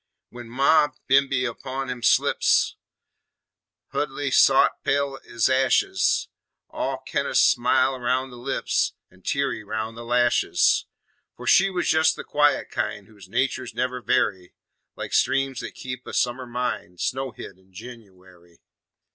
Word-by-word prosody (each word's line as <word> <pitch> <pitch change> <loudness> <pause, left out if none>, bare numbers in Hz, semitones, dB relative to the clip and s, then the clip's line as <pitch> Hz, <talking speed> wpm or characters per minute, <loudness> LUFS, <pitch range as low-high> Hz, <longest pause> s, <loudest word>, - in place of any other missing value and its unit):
When 120 -1 -11
Ma 140 +5 +4 0.2
bimeby 135 -1 +3
upon 130 +2 -4
'em 125 -1 -6
slips, - - +2 1.2
Huldy - - -2
sot - - +4
pale 140 -1 0
ez 115 -1 0
ashes, 130 0 +2 0.4
All - - -3
kin' - - -1
o' - - -4
smily 130 0 +3
roun' 130 +2 -1
the 125 - -11
lips 120 - -1 0.2
An' 95 0 -22
teary 140 -1 -2
roun' 110 +2 -4
the 120 +1 -9
lashes. 120 0 +2 0.5
For - - -9
she 195 +1 +5
was 185 -2 0
jes' 160 0 +3
the - - -7
quiet 145 0 +1
kind 100 - -3
Whose 100 -3 -16
naturs 130 0 -2
never 125 0 -2
vary, 95 -4 0 0.4
Like - - -7
streams 135 -2 +1
that - - -7
keep 125 0 -7
a - - -7
summer 125 +1 -1
mind 120 -7 -4
Snowhid 125 -7 -4
in 95 0 -27
Jenooary. 95 -6 -14
125 Hz, 140 wpm, -24 LUFS, 110-135 Hz, 1.2 s, she